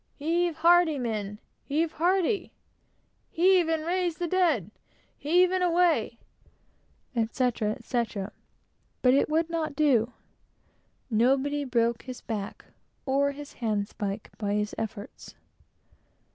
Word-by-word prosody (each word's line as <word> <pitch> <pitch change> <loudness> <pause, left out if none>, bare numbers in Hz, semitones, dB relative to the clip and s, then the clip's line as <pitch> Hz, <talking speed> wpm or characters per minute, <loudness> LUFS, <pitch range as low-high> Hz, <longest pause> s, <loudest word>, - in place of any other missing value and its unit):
"Heave 335 +3 0
hearty, 335 -1 +4
men! 215 -5 -3 0.3
heave 310 +3 0
hearty!" 370 +5 +1 0.8
"Heave 365 -2 +4
and 320 -1 0
raise 350 -1 0
the 350 - -2
dead!" 320 - +1 0.4
"Heave, 355 +5 +3
and 370 -1 +1
away!" 335 -10 +2 1.0
etc., 230 -1 0
etc.; 220 -5 -3 0.7
but 250 0 +6
it 280 - +3
would 320 +2 +1
not 320 -3 -2
do. 250 -6 +3 1.0
Nobody 270 +6 +2
broke 235 -2 +1
his 255 -1 -8
back 210 -3 -5 0.4
or 280 +1 +1
his 290 0 -10
hand 210 -4 -2
spike 205 +1 -5
by 205 -1 -1
his 210 0 -1
efforts. 220 -2 -7
280 Hz, 115 wpm, -27 LUFS, 225-335 Hz, 1.0 s, but